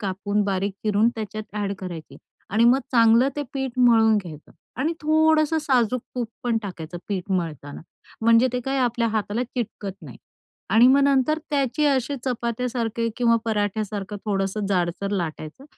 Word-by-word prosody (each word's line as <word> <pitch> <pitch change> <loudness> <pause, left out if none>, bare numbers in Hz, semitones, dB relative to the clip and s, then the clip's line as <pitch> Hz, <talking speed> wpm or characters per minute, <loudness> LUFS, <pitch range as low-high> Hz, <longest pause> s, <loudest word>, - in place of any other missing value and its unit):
कापून, 205 +1 -1
बारीक 195 0 -1
चिरून 215 +2 +3
त्याच्यात 215 -1 -5
ॲड 200 -1 -1
करायची 175 -4 -8 0.4
आणि 225 +2 +4
मग 250 +3 +5
चांगलं 230 +2 +5
ते 290 - -1
पीठ 265 -2 -4
मळून 225 -3 +5
घ्यायचं 165 -7 -7 0.3
आणि 320 +5 +1
थोडंसं 315 0 +3
साजूक 255 -4 +1
तूप 240 -3 -2
पण 235 -2 0
टाकायचं 175 -3 -7
पीठ 195 -1 -4
मळताना 155 -5 -3 0.4
म्हणजे 230 +3 +5
ते 250 - -1
काय 270 +2 -2
आपल्या 235 -2 +1
हाताला 215 +2 -1
चिटकत 230 -5 -5
नाही - - -10 0.5
आणि 230 +3 +6
मग 275 +2 +5
नंतर 280 +2 +2
त्याचे 280 0 0
असे 275 0 +1
चपात्यासारखे 235 -1 -2
किंवा 235 -1 +3
पराठ्यासारखं 210 -1 -2
थोडंसं 200 0 -1
जाडसर 185 +1 -1
लाटायचं 170 - -4
225 Hz, 150 wpm, -23 LUFS, 200-255 Hz, 0.5 s, आणि